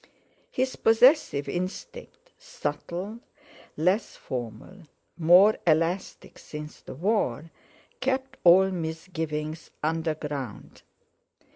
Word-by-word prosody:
His 260 +1 -1
possessive 225 - +4
instinct, 470 - -6
subtle, 210 - -5 0.6
less 185 +8 +1
formal, 125 - -7 0.3
more 180 +6 +6
elastic 165 +4 0
since 150 0 -9
the - - -9
War, 165 - 0 0.5
kept 265 +1 -2
all 190 +2 +7
misgiving 160 -2 -4 0.3
underground. 150 -6 -3
175 Hz, 80 wpm, -27 LUFS, 155-215 Hz, 0.6 s, all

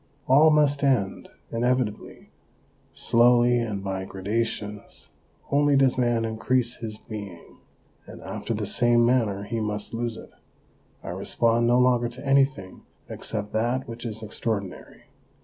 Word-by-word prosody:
All 145 +5 +6
must 150 -2 +3
end 125 -9 0 0.2
inevitably; 120 -2 -2 0.6
slowly 120 +1 +3
and 105 -4 -3
by 95 -1 -3
gradations 105 +2 -4 0.4
only 145 0 +3
does 135 -2 +3
man 120 -2 +1
increase 120 +2 +1
his 110 -2 -6
being, 100 -6 -10 0.5
and - - -11
after - - -4
the - - -3
same 120 0 +3
manner 110 -5 +1
he 115 +3 -4
must 105 0 -3
lose 115 0 -3
it. - - -12 0.7
I - - -7
respond 115 0 0
no 120 +1 +4
longer 125 -1 +3
to 125 +3 -11
anything 135 -8 +1 0.3
except 105 -2 -4
that 120 +4 -1
which 115 0 -8
is 110 -2 -6
extraordinary. 105 -3 -5
115 Hz, 130 wpm, -25 LUFS, 105-125 Hz, 0.7 s, All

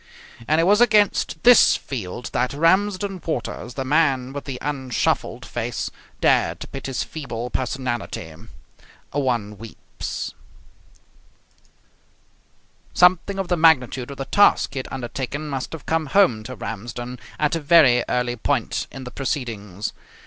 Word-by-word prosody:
And 155 +1 +3
it - - +4
was 205 +5 +4
against 210 -8 +3
this 245 -1 +7
field 120 -2 -6
that 125 +2 0
Ramsden 190 +3 +1
Waters, 120 -5 -4
the 135 - -3
man 135 -3 +2
with 145 - -6
the 135 -3 -5
unshuffled 135 -4 -1
face, - - -3 0.3
dared - - +2
to - - -6
pit 135 - -7
his 130 -5 -2
feeble 125 -6 -6
personality. 125 -10 -3 0.8
One 120 -7 -1
weeps. 115 0 -7 2.6
Something 180 +2 +4
of 195 -2 -2
the 175 - +1
magnitude 135 -6 +3
of 140 - -8
the 135 - -4
task 205 -3 +4
he 135 - -3
had 130 - -6
undertaken 135 +3 -4
must 135 -3 -4
have 160 - -8
come 160 -1 0
home 135 - +3
to 130 - -6
Ramsden 120 +4 -6 0.2
at 150 +1 +1
a - - -1
very 145 -6 +5
early 125 0 0
point 120 0 -1
in 135 - -8
the 125 - -8
proceedings. 110 - -4
135 Hz, 140 wpm, -22 LUFS, 120-160 Hz, 2.6 s, this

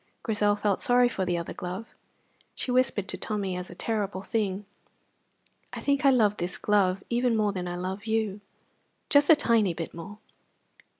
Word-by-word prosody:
Grizel 210 -2 +2
felt 205 -2 0
sorry 245 0 +4
for 195 -6 -2
the 175 -1 0
other 170 - -5
glove. 185 +5 -6 0.6
She 255 - -3
whispered 245 -6 +1
to 185 - -3
Tommy 200 -4 -2
as 180 0 -4
a 175 - -10
terrible 200 -2 -2
thing, 205 -2 -2 1.1
"I - - -5
think 280 0 0
I - - +8
love 215 -6 +3
this 175 +2 -2
glove 195 -2 +2
even 240 -1 +2
more 210 -1 +2
than 180 -2 -4
I 175 - -4
love 190 +4 -5
you 220 -2 -1 0.7
just 285 0 +5
a 320 - +10
tiny 225 - +2
bit 165 -1 -5
more." 190 +5 -9
205 Hz, 175 wpm, -27 LUFS, 185-230 Hz, 1.1 s, a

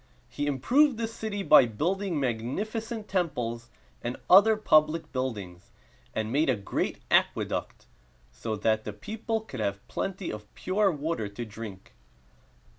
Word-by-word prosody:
He 145 0 -3
improved 245 - +3
the 225 0 -1
city 220 -3 -4
by 145 -8 +7
building 175 - -1
magnificent 210 - -3
temples 125 -11 -2 0.3
and 120 +1 -3
other 210 +4 +8
public 155 -5 +3
buildings, 105 -10 -4 0.5
and 110 0 -1
made 145 +3 +2
a 130 - +4
great 100 -2 -2
aqueduct, - - +1 0.5
so 65 - -4
that 110 +1 +1
the 105 - -5
people 220 - -3
could 140 - -9
have 100 -2 -2
plenty 195 -2 -3
of 105 -1 -9
pure 200 +2 +2
water 150 -7 -2
to 100 +4 -6
drink. 105 -3 -9
145 Hz, 135 wpm, -28 LUFS, -, 0.5 s, other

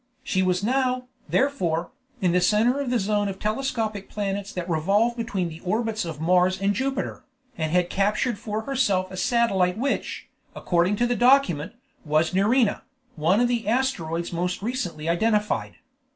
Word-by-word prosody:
She 190 - 0
was 185 0 +1
now, 255 +2 +1 0.3
therefore, 180 - 0 0.3
in 180 -2 +3
the 180 +1 +2
center 220 +8 +3
of 280 -3 -2
the 245 - +2
zone 205 0 0
of 195 -1 -4
telescopic 215 -2 -2
planets 200 -1 -3
that 180 -1 -5
revolve 200 +8 +2
between 205 -6 -2
the 160 -1 -9
orbits 220 +2 -1
of 160 -3 -6
Mars 180 +3 +3
and 200 +1 +1
Jupiter, 265 +5 -3 0.3
and 160 -6 -2
had 180 0 +1
captured 205 +3 0
for 215 +1 -3
herself 205 -8 0
a - - -7
satellite 190 -3 +1
which, 275 +4 -2 0.3
according 175 +3 +1
to 240 - +1
the 245 0 0
document, 240 - +3 0.3
was 155 +3 +1
Nerina, 210 +4 +2 0.3
one 165 +7 +2
of 245 - +3
the 235 -3 -1
asteroids 175 -10 -1
most 180 +3 -2
recently 195 -10 -3
identified. 210 +5 0
205 Hz, 160 wpm, -24 LUFS, 180-235 Hz, 0.3 s, in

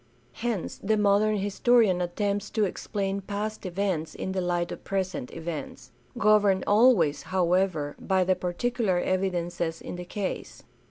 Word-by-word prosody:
Hence 225 - -3
the 215 +2 +1
modern 210 +1 +3
historian 205 -1 +3
attempts 200 +3 -1
to 215 -2 +1
explain 195 0 -3
past 205 +1 -4
events 180 -4 -2
in 190 - -4
the 190 0 -1
light 175 -1 -1
of - - -7
present 190 -9 -3
events, 160 -4 -6 0.3
governed 205 -3 +4
always, 205 - +4
however, 180 -4 0
by 190 -1 +1
the 185 +1 +2
particular 195 +2 -1
evidences 175 -3 -1
in - - -7
the 180 - -6
case. 195 +1 -5
190 Hz, 140 wpm, -27 LUFS, 175-205 Hz, 0.3 s, governed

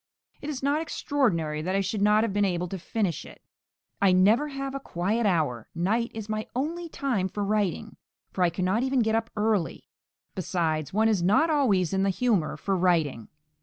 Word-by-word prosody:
It 290 - -5
is 270 -3 -5
not 285 +3 +1
extraordinary 180 - -1
that 185 +4 -2
I 195 - +2
should 195 +2 -2
not 210 +1 +4
have 225 -4 -1
been 205 0 +2
able 180 -2 0
to 190 - -5
finish 190 - -2
it. - - -13 0.6
I 200 -2 +5
never 205 +10 +4
have 275 -1 -5
a 275 - -3
quiet 210 +1 -1
hour; 150 - 0
night 215 +8 0
is 220 -2 -6
my 215 0 -3
only 330 +6 -3
time 240 -12 -1
for 205 +2 -3
writing, 205 -4 -1 0.4
for 185 - +1
I 175 - +4
cannot 185 +6 0
even 260 0 +1
get 220 -1 +1
up 225 0 0
early. 210 -5 0 0.5
Besides, 160 -5 -1
one 220 +3 +2
is 210 -5 +2
not 215 - +3
always 205 - +2
in 190 - +1
the 195 - +2
humour 195 -5 0
for 195 - -1
writing. 165 - +1
205 Hz, 195 wpm, -26 LUFS, 180-235 Hz, 0.6 s, I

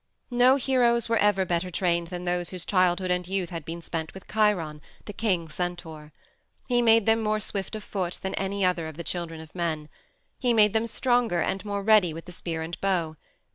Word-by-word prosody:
No 245 +2 +5
heroes 245 -3 +2
were 230 0 +2
ever 205 -2 +3
better 175 +1 -1
trained 170 -1 0
than 180 0 -6
those 175 0 -1
whose 180 -2 -5
childhood 185 -1 +2
and 180 -1 0
youth 190 -1 -2
had 165 -2 -5
been 165 +2 -7
spent 160 0 -4
with 190 - -11
Chiron 180 -9 +1 0.2
the 205 - -7
king 185 -8 0
centaur. 160 -2 -5 0.5
He 245 -1 +2
made 225 -2 +5
them 225 0 +3
more 215 0 +1
swift 200 0 -4
of 215 - -6
foot 185 -3 -3
than 190 - -2
any 195 0 -1
other 175 -3 0
of 160 -1 -9
the 170 - -5
children 170 -2 -4
of 160 -1 -12
men. 160 -4 -2 0.5
He 245 -2 +2
made 210 -2 +5
them 225 +1 +1
stronger 240 -6 +1
and 195 +3 -1
more 200 -1 -3
ready 200 -6 +4
with 165 - -8
the 180 - -10
spear 165 -2 -4
and 165 +1 -7
bow. 175 -5 0
185 Hz, 210 wpm, -26 LUFS, 170-215 Hz, 0.5 s, No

